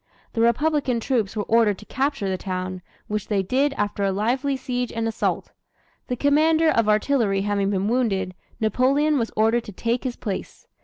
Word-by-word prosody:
The 230 - 0
republican 260 +1 +2
troops 230 -4 -1
were 210 - -1
ordered 220 -2 +3
to 210 - -13
capture 275 -5 -1
the 190 - 0
town, 185 -1 -4 0.3
which 210 -2 -3
they 200 -3 +1
did 275 +8 +1
after 205 -3 -2
a 195 - +2
lively 255 +8 0
siege 250 -2 -3
and 225 0 -2
assault. 225 - -2 0.6
The 250 - -1
commander 315 +4 +3
of 230 -5 +2
artillery 210 -2 +2
having 200 -1 0
been 195 0 0
wounded, 205 -6 0 0.3
Napoleon 270 +7 +2
was 230 - -1
ordered 225 +2 +2
to - - -8
take 230 +5 -1
his 255 -2 -3
place. 195 -4 -6
230 Hz, 175 wpm, -23 LUFS, 205-260 Hz, 0.6 s, ordered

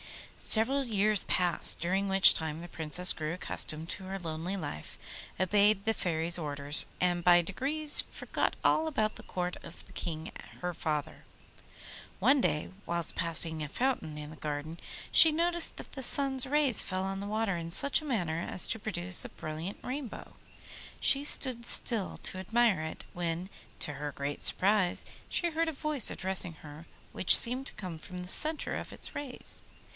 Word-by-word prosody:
Several 260 +6 +2
years 215 -3 +2
passed, 180 -2 +1
during 190 +4 -1
which 195 0 +7
time 160 -1 -3
the 175 - -9
Princess 165 +2 0
grew 155 +1 -4
accustomed 160 -2 -3
to 190 - -3
her 190 +1 -5
lonely 170 +2 -5
life, 75 - -7 0.4
obeyed 200 +2 +2
the 225 - +1
Fairy's 170 -2 0
orders, 145 -1 0
and 175 -1 0
by 175 0 +5
degrees 290 - 0
forgot - - -3
all 320 - +2
about 220 -8 -1
the - - -12
court 180 -1 -4
of 170 - -12
the - - -7
King 160 -2 -5 0.3
her 180 0 -4
father. 150 -3 -4 1.0
One 275 0 +4
day, 150 -8 -1 0.2
whilst 170 -1 -3
passing 165 -1 +1
near 150 - -4
a - - -17
fountain 240 - -2
in 150 0 -8
the - - -11
garden, 150 +3 -6 0.3
she 320 - +9
noticed 340 +1 0
that - - -10
the 265 - -8
sun's 270 0 +5
rays 280 -4 +3
fell 185 0 -3
on 195 0 -4
the 200 - -6
water 215 -2 -1
in 165 -1 -6
such 280 - +1
a - - -10
manner 175 - -2
as 180 - 0
to 225 - -3
produce 185 -4 +2
a - - -6
brilliant 160 +6 -7
rainbow. 260 -2 -7 0.7
She 275 +1 +4
stood 255 -4 +5
still 230 -4 -1
to 185 - +3
admire 220 -1 +1
it, 160 0 -6
when, 175 +1 -4 0.3
to 150 - +1
her 145 +1 -6
great 140 +1 -5
surprise, 195 -2 +2 0.2
she 345 -1 -1
heard 325 +1 -1
a - - -3
voice 300 -3 -1
addressing 185 -2 -2
her 155 +1 -13 0.2
which 185 - +6
seemed 255 +3 0
to - - +1
come 180 -5 -7
from 180 +3 -10
the 180 0 -7
centre 305 - +3
of - - -6
its - - -3
rays. 285 -3 -1
185 Hz, 175 wpm, -30 LUFS, 165-240 Hz, 1.0 s, she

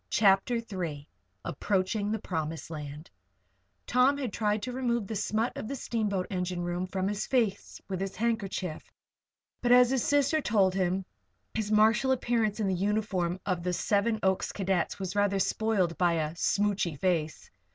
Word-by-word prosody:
CHAPTER 200 +3 +4
III 175 -10 -4 0.4
APPROACHING 200 +6 -1
THE 220 - 0
PROMISED 160 -5 -4
LAND 150 0 -7 0.7
Tom 255 +3 +3
had 255 -7 -3
tried 210 -1 0
to 250 - -3
remove 240 -3 -1
the 220 - -5
smut 215 +3 -1
of - - -5
the 275 - -3
steamboat 210 -7 -1
engine 180 -1 -2
room 175 +1 -2
from 190 0 -2
his 205 0 -2
face 230 -7 0
with 190 -1 -3
his 195 0 -3
handkerchief; 205 -7 -2 0.7
but 245 - +1
as 250 0 +7
his 265 -3 +1
sister 290 +2 +2
told 200 -7 +3
him, 185 0 0 0.5
his 215 -1 -2
martial 220 +5 +4
appearance 230 -4 +1
in 215 - +1
the 190 - +1
uniform 190 -2 0
of 185 -3 -1
the 180 +1 -1
Seven 215 +4 +1
Oaks 190 -1 +1
cadets 190 -3 -1
was 190 0 -4
rather 205 -1 +2
spoiled 195 -4 +1
by 175 -2 +3
"a 155 -2 -1
smootchy 200 -1 0
face." 165 -3 -1
200 Hz, 160 wpm, -29 LUFS, 180-225 Hz, 0.7 s, as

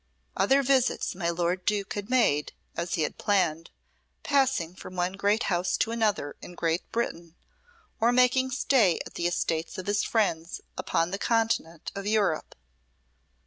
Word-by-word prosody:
Other 270 +8 +3
visits 260 -4 +2
my 175 -2 -2
lord 175 +2 -1
Duke 205 0 -1
had 205 +1 -5
made, 220 - +2 0.2
as 170 +2 -2
he 160 - 0
had - - -4
planned, 175 -6 +1 0.5
passing 265 - +1
from 185 0 -10
one 180 +1 0
great 205 +3 +1
house 175 -1 0
to 225 - 0
another 210 -10 0
in 180 - -10
Great 165 0 -1
Britain, 170 -8 -3 0.6
or 230 +2 +4
making 250 +1 +3
stay 245 -8 +3
at - - -11
the 170 - -1
estates 165 -1 -2
of 185 - -5
his 205 +1 +1
friends 170 -7 0 0.2
upon 165 +1 0
the 195 - -3
continent 225 -9 0
of 200 0 -5
Europe. 205 -7 0
195 Hz, 155 wpm, -27 LUFS, 170-225 Hz, 0.6 s, or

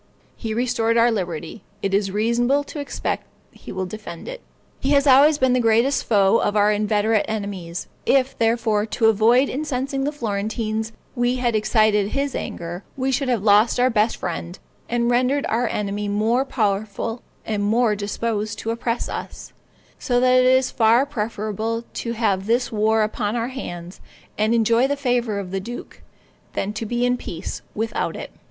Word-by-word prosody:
He 220 -2 -4
restored 230 -1 +1
our 235 +1 +5
liberty; 175 -2 -4 0.2
it 195 -1 -1
is 200 0 +2
reasonable 235 +7 +1
to 295 - -8
expect 285 - -3 0.2
he - - -11
will 185 0 -3
defend 180 -3 -8
it. - - -7 0.4
He 270 - -2
has 280 0 +4
always 285 +3 +6
been 260 -3 +3
the 255 - +3
greatest 235 +4 +2
foe 200 -1 +4
of 205 - 0
our 210 0 +4
inveterate 210 +1 +1
enemies; 200 -5 -4 0.2
if, 270 -1 +3
therefore, 225 -2 +1
to 225 +1 0
avoid 230 +5 +4
incensing 275 -1 -2
the 290 - 0
Florentines 220 -2 -2 0.2
we 245 0 +1
had 245 -3 0
excited 215 -1 +3
his 280 -1 -1
anger, 175 +2 -5
we 265 0 0
should 265 0 0
have 235 -5 0
lost 210 +3 +4
our 255 +1 +4
best 220 0 +1
friend, 175 0 -5 0.3
and 235 0 +1
rendered 255 +4 +2
our 235 +2 +1
enemy 205 -1 -2
more 220 +6 +1
powerful 215 0 -2 0.2
and 215 -2 -2
more 215 +1 +2
disposed 210 +1 -3
to 225 - -3
oppress 230 +1 -2
us; - - -7 0.5
so 245 -2 +1
that 255 0 +5
it 255 - +4
is 260 0 +3
far 230 +3 +4
preferable 220 -2 -3
to 235 - -3
have 205 -4 0
this 240 +2 +1
war 220 0 +2
upon 210 0 -2
our 235 +1 -1
hands, 175 -9 -7 0.3
and 215 +2 +2
enjoy 230 +3 +3
the 285 - 0
favor 245 -5 0
of 190 -2 -5
the 195 - -1
duke, 240 +6 -8 0.5
than 205 +2 -2
to 220 +1 -4
be 240 +2 0
in 245 0 +1
peace 170 -6 -6
without 220 +1 -2
it. - - -7
225 Hz, 175 wpm, -22 LUFS, 210-245 Hz, 0.5 s, always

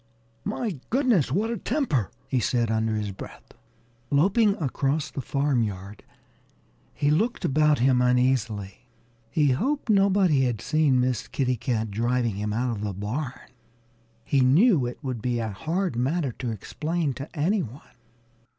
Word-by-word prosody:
"My 205 - -3
goodness! 240 - +2
What 210 - 0
a 235 - -2
temper!" 225 - 0 0.2
he 130 -1 0
said 120 -1 0
under 110 0 0
his 105 -1 -2
breath. 95 - -11 0.6
Loping 200 +8 +3
across 145 0 -1
the 135 - -4
farmyard, 110 -9 -1 0.9
he 145 0 0
looked 220 +10 0
about 150 +1 +3
him 125 0 +3
uneasily. 125 -6 0 0.4
He 145 +1 +2
hoped 260 - 0
nobody 195 -8 +4
had 120 -4 -1
seen 150 -2 +2
Miss 125 -2 0
Kitty 130 -2 0
Cat 115 -2 -2
driving 120 +1 0
him 105 +1 -2
out 120 +2 -1
of - - -6
the 105 -2 -3
barn. 120 +8 -4 0.9
He 140 - +2
knew 145 - +4
it 120 - -6
would 130 -4 -3
be 120 0 -1
a 115 -1 -2
hard 160 - -2
matter 135 +4 0
to 125 - -2
explain 150 - -2
to 135 +4 -7
any 190 +8 +2
one. 130 0 -8
130 Hz, 150 wpm, -25 LUFS, 115-160 Hz, 0.9 s, nobody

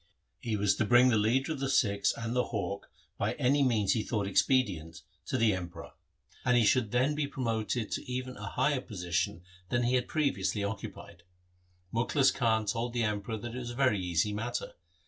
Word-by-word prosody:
He 110 -3 -2
was 100 -1 +2
to 110 - +1
bring 120 +3 +6
the 120 - +3
leader 120 +8 +2
of 155 - -3
the 135 0 -1
Sikhs 100 -6 +2
and 115 +1 -3
the 125 - +2
hawk 100 -3 -4 0.3
by 105 +3 0
any 140 +1 +2
means 110 -7 +3
he 115 - 0
thought 105 -2 -2
expedient 95 - +1 0.2
to 130 - -1
the 115 -3 +3
Emperor; 90 -2 -6 0.5
and 125 -1 +3
he 115 - +4
should 115 0 +3
then 130 +4 +2
be 150 -1 -1
promoted 115 -4 -2
to - - -4
even 130 0 -4
a - - -7
higher 145 -3 +1
position 90 -5 -2 0.3
than 120 0 +1
he 120 +1 +1
had 125 -1 +1
previously 105 - 0
occupied. 100 -2 -6 0.7
Mukhlis 130 +4 +3
Khan 110 -3 +1
told 115 +4 -2
the 120 -1 0
Emperor 105 +1 -2
that 120 +2 -7
it 125 - -4
was 120 -1 -5
a 120 - -6
very 130 -6 +2
easy 90 +3 0
matter. 115 +4 -3
115 Hz, 195 wpm, -30 LUFS, 100-125 Hz, 0.7 s, bring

